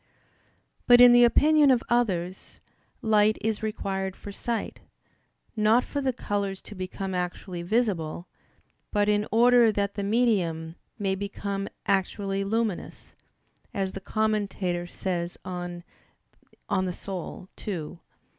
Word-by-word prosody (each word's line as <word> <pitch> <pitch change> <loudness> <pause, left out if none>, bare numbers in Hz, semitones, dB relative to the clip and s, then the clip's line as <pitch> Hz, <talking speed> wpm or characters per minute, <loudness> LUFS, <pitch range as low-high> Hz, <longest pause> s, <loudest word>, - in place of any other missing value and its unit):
But 245 0 +8
in 245 0 +9
the 240 0 +7
opinion 295 +4 +5
of 250 -3 +3
others, 190 -7 -1 0.4
light 215 -1 +4
is 220 -1 -2
required 195 -3 -3
for 205 - -9
sight; 230 +3 -4 0.8
not 220 +3 +4
for 285 - -3
the 265 -1 +1
colors 200 -5 -3
to - - -10
become 190 0 -5
actually 180 0 -4
visible; 175 -5 -1 0.6
but 205 0 +2
in 210 0 +2
order 240 0 +6
that 200 -1 -1
the 200 - -3
medium 195 -8 +1 0.2
may 195 -2 0
become 200 0 -4 0.2
actually 195 0 0
luminous, 220 -1 -3 0.6
as 195 -2 -1
the 195 - -7
Commentator 200 -5 -1
says 175 -1 -3
on 175 -1 -5 0.7
De - - -28
Anima 185 -1 -3 0.2
ii. 170 -4 -4
200 Hz, 120 wpm, -27 LUFS, 185-220 Hz, 0.8 s, in